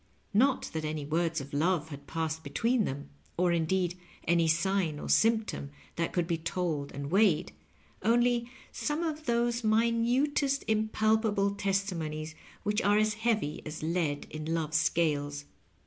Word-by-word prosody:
Not 260 +6 +3
that 160 -1 -2
any 155 -1 -3
words 165 +1 0
of 140 +1 -10
love 160 +1 +1
had 140 -1 -9
passed 160 -1 -2
between 225 - +1
them, 140 +2 -5 0.3
or, 180 0 +3
indeed, 175 +2 0 0.3
any 170 0 +3
sign 170 -1 +1
or - - -6
symptom 220 -10 +2 0.3
that 170 0 -1
could 175 -2 0
be 165 -1 -1
told 165 -4 -2
and 140 +1 -6
weighed; 195 -4 +3 0.5
only 240 +1 +2 0.2
some 300 +3 -2
of 310 -2 -3
those 235 0 +1
minutest, 240 +6 +2
impalpable 215 -1 +2
testimonies 180 -6 -2 0.3
which 210 0 +1
are 205 +1 +3
as 215 0 +3
heavy 220 -8 -1
as 155 0 -7
lead 160 -3 -1
in 155 +1 -4
Love's 155 -1 0
scales. 145 -3 0
180 Hz, 145 wpm, -30 LUFS, 155-220 Hz, 0.5 s, Not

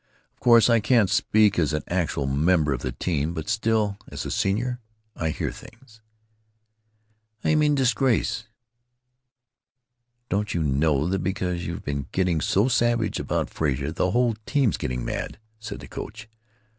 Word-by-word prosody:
Of - - -39
course 115 -2 +6
I 115 -1 +4
can't 105 -2 +3
speak 105 -1 +3
as 75 -2 +1
an 75 - -1
actual 85 -5 -1
member 75 +2 +2
of 60 - -4
the - - -3
team, 80 -1 -2
but 80 -2 -5
still, 110 -2 0
as - - -6
a - - -4
senior, 120 +6 0 0.4
I 80 - -2
hear - - -2
things——" 115 -4 -15 1.4
"How - - +1
d'you 155 - +4
mean 150 -1 +3
'disgrace'?" 120 -3 +1 1.8
"Don't 100 +1 -1
you 85 - +1
know 75 +1 +2
that 95 +3 0
because 90 -2 -2
you've 85 +5 -5
been 70 -1 -3
getting 90 -4 +1
so 100 +6 +2
savage 120 -3 +1
about - - -2
Frazer 70 -1 -1
the 90 +3 0
whole 120 +2 +2
team 135 -4 +2
's - - -2
getting 60 -1 -3
mad?" - - -4 0.2
said 110 - -7
the - - -10
coach. 105 +1 -8
95 Hz, 160 wpm, -25 LUFS, 80-115 Hz, 1.8 s, course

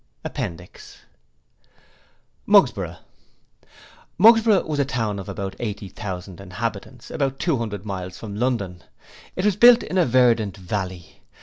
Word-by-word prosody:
Appendix 85 +1 -7 1.5
Mugsborough - - +3 1.2
Mugsborough 220 +1 +6
was 150 -2 -3
a - - +4
town 110 -6 -2
of 95 - -8
about 95 0 -5
eighty 105 -3 -5
thousand 95 -2 -7
inhabitants, 115 +5 -6
about 135 -2 -1
two 160 -1 0
hundred 105 -3 -5
miles 95 -2 -6
from 105 -3 -8
London. 105 -7 -2 0.5
It 185 - -2
was 210 -3 +3
built 240 +3 +7
in 185 - -1
a 175 - +4
verdant 115 -5 +2
valley. 95 -2 -6
110 Hz, 125 wpm, -23 LUFS, 95-135 Hz, 1.5 s, built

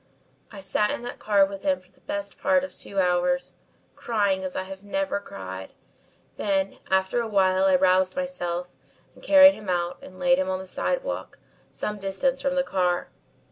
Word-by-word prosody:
"I 200 -3 -9
sat 210 +2 +1
in 285 -4 -3
that 245 - -7
car 200 -2 +4
with 195 0 -7
him 285 -1 +1
for - - -26
the - - -29
best 300 0 -5
part 280 -1 +3
of 280 - -6
two 200 - -5
hours, 180 -1 +1 0.4
crying 200 -5 0
as 185 -1 -5
I 190 +1 -4
never 245 +3 -2
have - - -16
cried, 95 0 -8 0.6
then 195 -1 -1
after 190 +5 +2
a 230 - -3
while 190 -2 +3
I 190 -1 +5
roused 185 0 +3
myself 180 -11 -3 0.4
and - - -19
carried 285 0 +8
him 210 -6 -9
out 175 -1 -1
and 185 - -12
laid 265 +3 +3
him 280 - 0
on 185 - 0
the 190 - -8
sidewalk, - - -3 0.3
some 210 -1 -4
distance 200 +8 -1
from 275 0 0
the 270 - +2
car. 180 -7 0
195 Hz, 185 wpm, -25 LUFS, 185-270 Hz, 0.6 s, carried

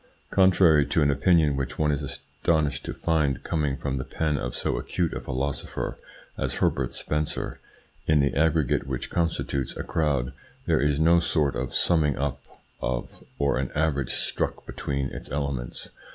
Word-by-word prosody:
Contrary 90 -5 +5
to 70 +3 +2
an 70 - +4
opinion 75 +1 +4
which 65 -2 -3
one 75 -1 +2
is 70 0 -1
astonished 75 +2 -1
to - - -4
find 75 -6 0
coming 75 -5 0
from 70 -2 -2
the 65 - -2
pen 80 +1 -1
of 60 -3 -3
so - - -1
acute 85 -3 -1
a - - -3
philosopher 65 +2 -3 0.4
as - - -1
Herbert 65 -2 +1
Spencer, 75 0 -3 0.5
in 75 -1 +5
the 70 -1 +2
aggregate 75 -3 +2
which 65 -2 -4
constitutes 80 -5 -1
a - - -3
crowd 70 -5 0 0.3
there - - +2
is 70 0 +2
in 80 - +2
no 85 +1 +6
sort 75 -4 +1
a 65 0 -2
summing 75 -5 +2
up 70 -1 -2 0.4
of - - -3
or 70 -2 +1
an 65 - -1
average 75 -4 +1
struck - - -2
between 70 -1 -3
its - - -8
elements. 70 -4 -3
70 Hz, 165 wpm, -26 LUFS, 70-80 Hz, 0.5 s, no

